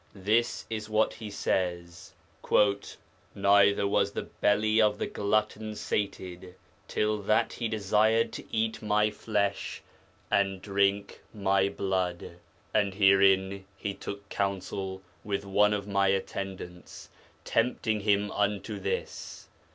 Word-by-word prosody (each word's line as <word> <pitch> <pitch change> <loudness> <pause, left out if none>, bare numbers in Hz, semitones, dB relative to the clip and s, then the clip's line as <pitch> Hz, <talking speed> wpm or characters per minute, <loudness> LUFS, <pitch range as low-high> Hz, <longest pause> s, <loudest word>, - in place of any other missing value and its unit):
This 110 +5 +1
is 110 -1 -5
what 110 0 +2
he 110 -2 -8
says, 85 -3 -2 1.2
'Neither 100 0 +4
was 100 - +1
the - - -3
belly 110 +2 +2
of 105 -1 +3
the - - -2
glutton 110 +1 -1
sated 95 -3 -4 0.3
till 105 0 0
that 110 +3 +1
he 115 - -2
desired 110 +2 +2
to - - -6
eat 110 0 -1
my 105 0 +2
flesh 105 -2 -2 0.5
and 95 -1 +2
drink 100 +1 0
my 100 -1 +2
blood.... 90 -3 -2 0.4
And 100 -3 +1
herein 95 -1 +4
he 100 - -3
took 100 +1 -8
counsel 95 -1 -3 0.2
with 100 -1 -3
one 105 +2 +3
of 105 -1 -2
my 100 -1 +2
attendants, 95 -2 -4 0.3
tempting 115 -2 +1
him 105 0 +1
unto 105 0 -1
this.... - - -5
100 Hz, 120 wpm, -28 LUFS, 95-105 Hz, 1.2 s, Neither